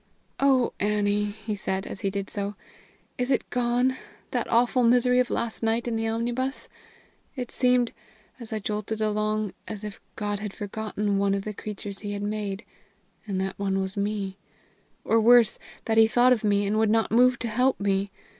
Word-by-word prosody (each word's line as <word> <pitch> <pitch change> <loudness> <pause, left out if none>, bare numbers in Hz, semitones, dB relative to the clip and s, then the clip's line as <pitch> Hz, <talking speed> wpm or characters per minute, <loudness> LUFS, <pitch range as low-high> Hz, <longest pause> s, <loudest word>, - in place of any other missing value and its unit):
"Oh, 265 -3 +3
Annie!" 210 0 +1
he 210 +1 -5
said, 190 0 -3
as - - -7
he 195 - 0
did 195 0 -3
so, 200 0 -4 0.6
"is 250 +1 0
it 260 - +1
gone, 245 +1 +2 0.4
that - - -1
awful 245 +2 +3
misery 250 +1 +4
of 250 - +2
last 235 -1 -2
night 225 +1 0
in 235 - -1
the 225 0 -1
omnibus? 240 +4 -2 0.7
It 250 -3 -5
seemed, 250 -2 +2 0.5
as 235 -2 -8
I 220 - -1
jolted 210 +1 -3
along, 215 -1 0
as 215 -2 -6
if 210 -1 -7
God 205 -1 -2
had 210 -1 -5
forgotten 205 -1 -2
one 200 0 +2
of 195 - -3
the 215 - -4
creatures 205 -1 -7
he 205 -1 -4
had 200 0 -4
made, 205 0 -3 0.6
and 195 -2 -2
that 190 +1 -3
one 195 -1 0
was 190 0 -3
me; 200 -1 -2 0.7
or, 225 0 +3
worse, 240 0 +6 0.3
that 225 0 +3
he 220 - +7
thought 245 +3 +5
of 230 - -2
me, 205 -1 +2
and 210 +2 +1
would 220 -1 +3
not 225 +1 +2
move 250 +2 +5
to 235 - -3
help 250 +4 +1
me! 200 0 +1
215 Hz, 185 wpm, -26 LUFS, 205-235 Hz, 0.7 s, he